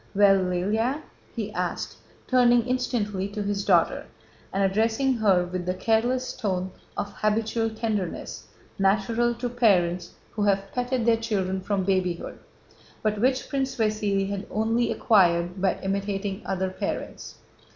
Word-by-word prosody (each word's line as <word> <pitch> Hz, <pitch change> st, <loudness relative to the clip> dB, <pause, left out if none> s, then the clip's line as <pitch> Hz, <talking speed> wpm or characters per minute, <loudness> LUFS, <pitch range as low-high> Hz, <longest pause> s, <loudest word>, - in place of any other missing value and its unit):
"Well, 200 Hz, -1 st, +6 dB
Lëlya?" 210 Hz, -, 0 dB, 0.3 s
he -, -, -4 dB
asked, -, -, -3 dB, 0.3 s
turning 245 Hz, -2 st, +4 dB
instantly 235 Hz, -6 st, -1 dB
to 205 Hz, +1 st, -4 dB
his 200 Hz, 0 st, -1 dB
daughter 175 Hz, -4 st, +2 dB, 0.4 s
and 195 Hz, +1 st, 0 dB
addressing 220 Hz, +7 st, +2 dB
her 195 Hz, -5 st, +3 dB
with 180 Hz, 0 st, -5 dB
the 180 Hz, -, 0 dB
careless 240 Hz, +5 st, +1 dB
tone 190 Hz, -5 st, -2 dB, 0.3 s
of 200 Hz, 0 st, -3 dB
habitual 225 Hz, +1 st, 0 dB
tenderness 220 Hz, -5 st, -3 dB, 0.3 s
natural 220 Hz, +5 st, +2 dB
to 245 Hz, +1 st, -3 dB
parents 185 Hz, -8 st, +2 dB, 0.2 s
who 215 Hz, -, -4 dB
have 195 Hz, -1 st, +1 dB
petted 250 Hz, -1 st, -1 dB
their 230 Hz, -1 st, +4 dB
children 195 Hz, -4 st, -1 dB
from 200 Hz, 0 st, -1 dB
babyhood, 185 Hz, -2 st, -1 dB, 0.6 s
but 210 Hz, -1 st, 0 dB
which 255 Hz, +1 st, +1 dB
Prince 270 Hz, -1 st, -1 dB
Vasíli 210 Hz, -4 st, 0 dB
had 200 Hz, 0 st, -4 dB
only 225 Hz, +2 st, +1 dB
acquired 175 Hz, -3 st, +3 dB
by 190 Hz, -, +1 dB
imitating 195 Hz, +1 st, -2 dB
other 190 Hz, -1 st, -1 dB
parents. -, -, -5 dB
205 Hz, 135 wpm, -26 LUFS, 190-230 Hz, 0.6 s, Well